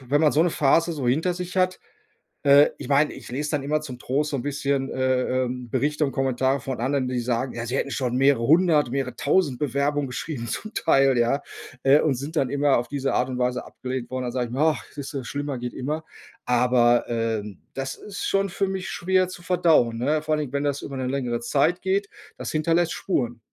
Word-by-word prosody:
wenn 135 +3 +1
man 155 -2 +5
so 155 - +4
'ne 175 - +2
Phase 165 +4 +3
so 140 -6 -2
hinter 165 +8 +1
sich 180 +1 -6
hat. 185 0 +1 0.6
Äh, 145 0 +7
ich - - -8
meine, 145 +2 +3
ich - - -11
lese 145 +3 -2
dann 145 -3 -1
immer 150 +2 0
zum 130 -5 -7
Trost 140 +4 -1
so - - -1
'n - - -3
bisschen, 140 -1 -1
äh, 130 0 +1
ähm, 125 0 -5
Berichte 145 +4 0
und 135 - -3
Kommentare 135 +1 +1
von 130 -1 -5
anderen, 135 0 0
die 125 -1 -1
sagen: 120 +2 -1
Ja, 115 -1 -4
sie 125 +2 -3
„hätten 140 - -2
schon 125 -2 -1
mehrere 135 -3 +3
hundert, 155 -3 +4
mehrere 130 -2 -2
tausend 145 0 +1
Bewerbungen 145 +1 0
geschrieben“, 125 -1 -5
zum 215 - -5
Teil, 135 -2 +3
ja, 120 +4 +2 0.4
äh, 140 +3 +6
und 150 -4 +1
sind 140 +6 -6
dann 135 -5 +1
immer 145 0 +3
auf 120 - -2
diese 140 -1 -1
Art 125 +1 +1
und 130 - -4
Weise 125 0 -1
abgelehnt 130 -1 -5
worden. 130 0 -2
Dann 120 - -3
sage 125 -2 -1
ich - - -11
mir: 130 - -4
„Ach, 155 -7 +2
siehst 140 -1 -7
du, 135 -2 -3
schlimmer 145 +1 -4
geht 120 0 -5
immer.“ 150 +5 -3 0.4
Aber, 120 -1 +3
ähm, 110 -4 -3
das 135 0 -4
ist 205 -1 -7
schon 195 0 +1
für 195 +2 -1
mich 190 -1 -4
schwer 185 +2 +1
zu 185 - -9
verdauen, 160 -10 +3
ne? 150 +6 +1
Vor 155 0 0
allen 155 - +1
Dingen, 140 -4 -5
wenn 140 0 0
das 145 -1 -1
über 140 - -6
'ne 130 -1 -2
längere 125 -3 -1
Zeit 140 +9 +1
geht. 195 +1 0 0.3
Das - - -5
hinterlässt 165 +2 +1
Spuren. 120 -10 -2
140 Hz, 225 wpm, -24 LUFS, 125-155 Hz, 0.6 s, Äh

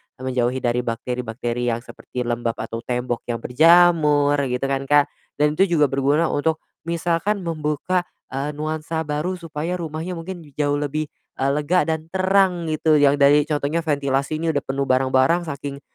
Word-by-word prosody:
eee, - - -16
menjauhi 130 0 0
dari 120 0 +1
bakteri-bakteri 120 0 -3
yang 115 - -4
seperti 125 - -7
lembap 120 -1 -1
atau 115 +1 -5
tembok 125 -1 -2
yang 115 -2 -3
berjamur 150 -1 +5
gitu 125 +1 -3
kan, 135 0 -1
Kak. 145 0 +4 0.3
Dan 150 +1 +1
itu 195 - +4
juga 150 -3 +4
berguna 140 +4 +2
untuk 160 +2 0 0.2
misalkan 170 +4 0
membuka, 165 +2 -1 0.2
eee, 140 +3 -3
nuansa 155 +2 -3
baru 150 +4 -2
supaya 165 -1 -4
rumahnya 165 0 -4
mungkin 170 0 -7
jauh 145 0 0
lebih, 150 +1 -2 0.2
eee, 135 - 0
lega 150 +6 +2
dan 160 -1 -2
terang 185 -3 +2
gitu. 155 0 +2
Yang 145 -1 +5
dari 145 +1 +6
contohnya 150 +2 0
ventilasi 140 -1 0
ini 160 0 -1
udah 145 - 0
penuh 135 +1 -2
barang-barang, 130 +6 +2
saking 140 -1 -6
150 Hz, 160 wpm, -22 LUFS, 135-165 Hz, 0.3 s, dari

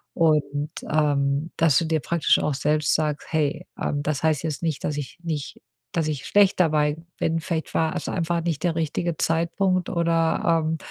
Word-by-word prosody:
Und, 150 -3 +1 0.2
ähm, 145 0 +1
dass 160 -5 +4
du 170 - -1
dir 160 -1 0
praktisch 170 +1 +2
auch 150 - 0
selbst 150 +2 +1
sagst: 150 -1 -1
„Hey, 150 -2 0 0.2
ähm, 145 0 -1
das 145 -1 -1
heißt 155 -2 +2
jetzt 155 -3 -3
nicht, 160 -4 -2
dass 150 - -2
ich 145 -3 -6
nicht 155 -4 -4 0.3
dass 165 -2 0
ich 150 -3 -3
schlecht 200 -2 +4
dabei 150 -3 +2 0.2
bin, 165 0 +1
vielleicht 160 -1 -3
war 160 -1 +1
es - - -4
einfach 170 -1 -1
nicht 165 -3 -2
der 170 -2 +1
richtige 165 +1 -1
Zeitpunkt 175 +3 +1
oder, 165 -1 +1
ähm, 160 +1 -1
160 Hz, 180 wpm, -24 LUFS, 150-165 Hz, 0.3 s, dass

